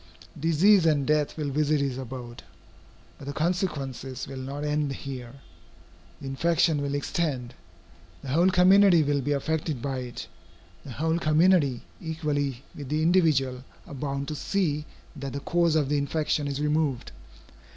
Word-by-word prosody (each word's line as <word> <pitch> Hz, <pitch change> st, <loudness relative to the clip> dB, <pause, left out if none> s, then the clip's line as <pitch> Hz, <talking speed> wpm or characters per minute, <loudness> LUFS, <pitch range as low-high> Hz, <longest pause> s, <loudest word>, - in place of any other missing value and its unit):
Disease 165 Hz, +4 st, +4 dB
and 145 Hz, -3 st, +2 dB
death 150 Hz, +1 st, +1 dB
will 145 Hz, -2 st, -2 dB
visit 150 Hz, +1 st, +1 dB
his 135 Hz, -2 st, -2 dB
abode. 125 Hz, -2 st, -8 dB, 0.8 s
But 135 Hz, -, -10 dB
the 140 Hz, -, -3 dB
consequences 140 Hz, -7 st, -2 dB
will 135 Hz, -, -7 dB
not 140 Hz, +3 st, -5 dB
end 150 Hz, -1 st, 0 dB
here. 130 Hz, -2 st, -7 dB, 0.8 s
The -, -, -10 dB
infection 155 Hz, +2 st, +1 dB
will 140 Hz, 0 st, -2 dB
extend. 140 Hz, -4 st, -2 dB, 0.7 s
The 135 Hz, -, -6 dB
whole 170 Hz, +7 st, +4 dB
community 185 Hz, -2 st, +6 dB
will 145 Hz, -1 st, +1 dB
be 145 Hz, +3 st, 0 dB
affected 150 Hz, 0 st, -2 dB
by 135 Hz, +1 st, -3 dB
it. 125 Hz, -1 st, -6 dB, 0.6 s
The 130 Hz, -, -8 dB
whole 160 Hz, +5 st, 0 dB
community, 155 Hz, -4 st, +3 dB, 0.2 s
equally 145 Hz, -5 st, -2 dB
with 140 Hz, -3 st, -8 dB
the 155 Hz, +1 st, 0 dB
individual, 150 Hz, -8 st, +2 dB, 0.2 s
are -, -, -10 dB
bound 140 Hz, 0 st, -3 dB
to 155 Hz, -, -3 dB
see 150 Hz, -3 st, -1 dB, 0.3 s
that 140 Hz, -2 st, -6 dB
the 140 Hz, -, -3 dB
cause 170 Hz, +2 st, +1 dB
of 150 Hz, -3 st, +2 dB
the 145 Hz, 0 st, +2 dB
infection 150 Hz, 0 st, -1 dB
is 140 Hz, 0 st, -3 dB
removed. 150 Hz, -3 st, 0 dB
145 Hz, 150 wpm, -26 LUFS, 135-160 Hz, 0.8 s, community